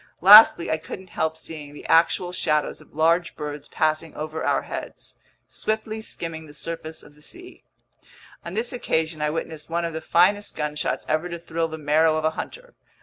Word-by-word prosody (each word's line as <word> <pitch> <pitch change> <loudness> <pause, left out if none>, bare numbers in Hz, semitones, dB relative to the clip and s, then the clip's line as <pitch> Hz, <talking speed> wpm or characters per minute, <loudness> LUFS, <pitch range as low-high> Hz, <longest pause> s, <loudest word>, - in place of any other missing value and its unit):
Lastly, 200 -2 +9
I 160 - +1
couldn't 180 +3 -10
help 160 0 -1
seeing 150 -3 -6
the - - -11
actual 170 +2 +3
shadows 150 -4 0
of - - -20
large 165 +3 +2
birds 150 -1 -6
passing 155 0 -1
over 155 +1 -5
our - - +1
heads, - - -8 0.3
swiftly 220 0 -3
skimming 165 -6 -6
the 145 - -14
surface 160 +1 -6
of 145 - -16
the 150 - -22
sea. 360 - -10 0.8
On 170 +2 -7
this 235 +3 0
occasion 160 -9 -1
I 150 - +1
witnessed 160 0 -5
one 170 +1 -1
of 165 - -4
the 160 - -4
finest 195 +6 +2
gunshots 150 0 -2
ever 155 +3 0
to 170 - -5
thrill 165 -1 -2
the 160 0 -7
marrow 155 +1 +3
of 155 - -1
a 160 - +3
hunter. - - -8
160 Hz, 185 wpm, -24 LUFS, 155-175 Hz, 0.8 s, Lastly